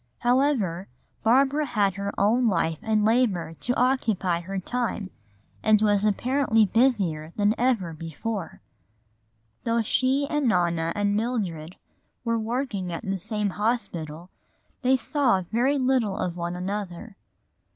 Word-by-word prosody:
However, 240 - +1 0.3
Barbara 275 +6 +3
had 205 -6 +1
her 200 +1 -3
own 230 +5 +3
life 165 -5 0
and 215 -1 +1
labor 220 -8 +1
to 245 - -1
occupy 220 -9 +1
her 190 +3 -5
time 215 -1 -3 0.5
and 215 -1 +4
was 205 -1 +2
apparently 225 +1 +2
busier 190 -9 +1
than 205 0 +2
ever 230 -9 0
before. 165 +5 -5 1.0
For - - -3
although 230 0 +2
she 260 +5 +1
and 295 -3 0
Nona 170 -5 +1
and 205 0 +1
Mildred 195 -8 -2 0.5
were 230 -1 0
working 220 -5 -3
at 170 - -5
the 195 0 -2
same 210 +2 -2
hospital, 180 -7 -3 0.5
they 260 0 +3
saw 245 -7 +1
very 255 +5 +2
little 255 -6 +1
of 175 -1 -2
one 175 0 -3
another. 195 +2 -5
210 Hz, 130 wpm, -25 LUFS, 180-245 Hz, 1.0 s, and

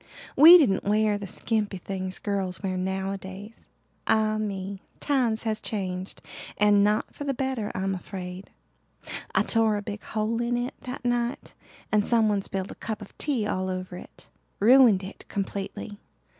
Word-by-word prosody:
We 325 +6 +11
didn't 260 - +2
wear 210 0 +2
the 200 - -6
skimpy 210 -1 -2
things 185 0 -4
girls 195 -3 -3
wear 190 -1 -1
nowadays. 190 +2 -5 0.4
Ah 215 -1 +2
me, 195 -2 -4 0.2
times 245 -6 +1
has 220 -2 -2
changed 185 -3 -4 0.3
and 205 -1 +5
not 210 +1 +1
for - - -7
the 275 -2 -1
better 260 -5 -2
I'm 195 +1 -1
afraid. 185 0 -7 0.9
I - - +4
tore 225 -2 +2
a 205 - -5
big 210 0 -6
hole 220 +2 -2
in 240 0 0
it 245 +1 -2
that 255 -2 -7
night 240 +1 -1 0.4
and 210 -1 +3
someone 215 -4 +3
spilled 195 0 -4
a - - -13
cup 215 -1 -4
of 195 - -15
tea 265 -8 0
all 185 -2 -1
over 185 -1 -4
it. - - -12 0.3
Ruined 230 -3 +6
it 190 - -9
completely. 200 +1 -5
210 Hz, 155 wpm, -26 LUFS, 190-225 Hz, 0.9 s, We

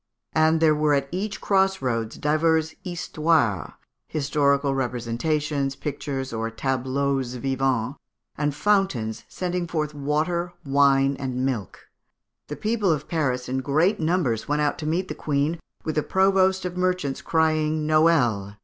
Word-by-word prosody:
And 160 0 +3
there 160 -1 +5
were 150 -1 +2
at 140 -1 0
each 195 +4 -3
cross 195 -1 +2
roads 115 -4 -2
divers 160 +1 +1
histoires 155 - 0 0.3
(historical 140 -1 +1
representations, 135 +3 -1
pictures, 140 -3 -4
or 115 0 -2
tableaux 130 +3 -1
vivants), 130 0 -1 0.4
and 145 -1 -1
fountains 150 - +1
sending 180 -1 -3
forth 155 -2 -2
water, 155 +5 -1
wine, 140 0 +3
and 130 -2 -2
milk. 115 -9 -3 0.7
The 150 - -5
people 215 -2 0
of 150 -2 -2
Paris 130 -7 -1
in 130 +1 -1
great 155 +10 +2
numbers 155 -9 0
went 150 +1 +1
out 145 - 0
to 150 - -4
meet 175 +4 0
the - - -4
Queen, 150 +3 -1 0.2
with 155 - -2
the 155 - +1
Provost 190 +1 +2
of 180 - -3
the 180 - -6
Merchants, 180 -7 0
crying 155 -1 +1
'_Noel! 130 -11 +2
150 Hz, 140 wpm, -24 LUFS, 135-165 Hz, 0.7 s, there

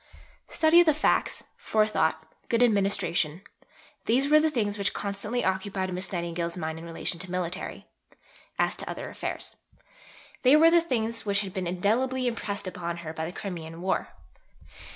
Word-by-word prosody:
Study 325 +1 +5
of 345 - +5
the 310 - +5
facts, 305 - +1
forethought, 215 0 +1 0.2
good 240 -1 +4
administration: 195 -6 +1 0.6
these 260 +5 +3
were 305 0 +7
the 315 +1 +3
things 210 -8 0
which 200 - -1
constantly 210 +4 -2
occupied 190 0 -1
Miss 185 +1 -3
Nightingale's 170 -1 -2
mind 160 -1 -4
in 165 - -9
relation 170 +1 -3
to 185 - -3
military, 180 0 -4 0.7
as - - +2
to - - -5
other, - - -5
affairs. - - -3 0.8
They 260 +3 +6
were 325 +2 +7
the 340 0 +6
things 230 -7 -2
which 200 -1 +1
had 195 -3 -5
been 185 -3 -2
indelibly 240 +9 +1
impressed 215 -4 -2
upon 170 -2 -4
her 160 - -5
by 160 0 -3
the 165 - -4
Crimean 170 -4 -6
War. 185 +2 -1
200 Hz, 160 wpm, -27 LUFS, 175-240 Hz, 0.8 s, were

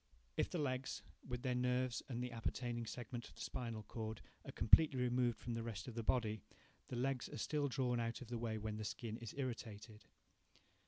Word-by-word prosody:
If - - +2
the - - -1
legs, 130 -3 0 0.2
with 125 -1 -2
their 130 - +2
nerves 125 0 +2
and 120 -1 -1
the 125 - -2
appertaining 120 0 -1
segment 120 0 -4
of - - -17
the - - -9
spinal 115 -3 -2
cord, 110 +1 -4 0.2
are - - -6
completely 135 +4 +7
removed 125 -1 +3
from 120 - -3
the 115 - -1
rest 115 -3 -4
of 125 - -4
the 115 - -1
body, 110 -3 +2 0.5
the - - -3
legs 130 +1 +1
are - - -5
still 145 +5 +1
drawn 125 -3 +2
out 115 0 0
of 125 - -8
the 120 -1 -1
way 115 -1 0
when 105 0 -2
the 110 - -2
skin 110 +1 -3
is 115 -3 -6
irritated. 115 -4 -4
120 Hz, 205 wpm, -41 LUFS, 115-125 Hz, 0.5 s, completely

